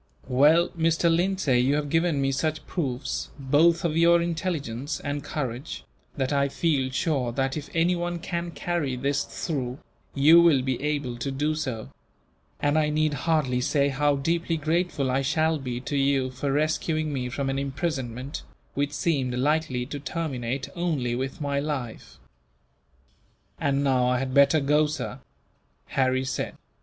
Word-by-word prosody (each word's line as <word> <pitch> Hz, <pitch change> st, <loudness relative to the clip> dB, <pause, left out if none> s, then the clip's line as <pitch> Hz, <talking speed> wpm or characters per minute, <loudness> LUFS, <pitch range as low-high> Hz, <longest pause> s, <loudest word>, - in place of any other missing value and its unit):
"Well, 150 Hz, +7 st, +4 dB
Mr. 165 Hz, 0 st, +2 dB
Lindsay, 175 Hz, -8 st, +2 dB
you 130 Hz, +3 st, +3 dB
have 145 Hz, -1 st, -2 dB
given 165 Hz, -2 st, +2 dB
me 135 Hz, 0 st, +1 dB
such 155 Hz, +3 st, -1 dB
proofs, 135 Hz, -6 st, -3 dB
both 155 Hz, +5 st, +3 dB
of 160 Hz, -2 st, 0 dB
your 170 Hz, +1 st, +5 dB
intelligence 160 Hz, -6 st, -3 dB
and 145 Hz, 0 st, -4 dB
courage, 130 Hz, -1 st, -4 dB, 0.3 s
that 135 Hz, +1 st, 0 dB
I 140 Hz, 0 st, +2 dB
feel 140 Hz, -3 st, 0 dB
sure 130 Hz, -3 st, 0 dB
that, 135 Hz, +1 st, -1 dB
if 150 Hz, -1 st, -6 dB
anyone 175 Hz, +1 st, +1 dB
can 170 Hz, 0 st, -4 dB
carry 165 Hz, -4 st, -2 dB
this 140 Hz, +3 st, 0 dB
through, 130 Hz, -6 st, -4 dB, 0.4 s
you 155 Hz, +5 st, +7 dB
will 155 Hz, -7 st, +4 dB
be 130 Hz, -1 st, -2 dB
able 145 Hz, -5 st, -2 dB
to 130 Hz, +3 st, -3 dB
do 145 Hz, +3 st, 0 dB
so; 130 Hz, -8 st, -4 dB, 0.7 s
and 145 Hz, +2 st, +2 dB
I 150 Hz, -1 st, +2 dB
need 155 Hz, 0 st, +1 dB
hardly 145 Hz, -5 st, +1 dB
say 140 Hz, +2 st, +2 dB
how 145 Hz, +1 st, +2 dB
deeply 165 Hz, +4 st, 0 dB
grateful 155 Hz, -3 st, 0 dB
I 135 Hz, +2 st, +1 dB
shall 155 Hz, +3 st, +1 dB
be, 125 Hz, -3 st, -4 dB
to 145 Hz, -, -4 dB
you, 135 Hz, -2 st, +2 dB
for 135 Hz, +2 st, -2 dB
rescuing 155 Hz, +1 st, 0 dB
me 125 Hz, -2 st, -2 dB
from 135 Hz, +2 st, -3 dB
an 135 Hz, 0 st, -1 dB
imprisonment 135 Hz, -2 st, -3 dB, 0.3 s
which 145 Hz, +1 st, -1 dB
seemed 135 Hz, -7 st, 0 dB
likely 135 Hz, -1 st, 0 dB
to 145 Hz, +2 st, -6 dB
terminate 135 Hz, -4 st, -3 dB
only 155 Hz, -9 st, -1 dB
with 130 Hz, +2 st, -3 dB
my 140 Hz, -1 st, 0 dB
life." 130 Hz, -, -5 dB, 1.4 s
"And 140 Hz, 0 st, +1 dB
now 130 Hz, -3 st, +2 dB
I 125 Hz, 0 st, +2 dB
had 130 Hz, 0 st, -3 dB
better 140 Hz, +3 st, +5 dB
go, 150 Hz, +2 st, +3 dB
sir," 125 Hz, -8 st, -5 dB, 0.7 s
Harry 130 Hz, 0 st, +1 dB
said. 130 Hz, -, -3 dB
145 Hz, 155 wpm, -26 LUFS, 130-160 Hz, 1.4 s, you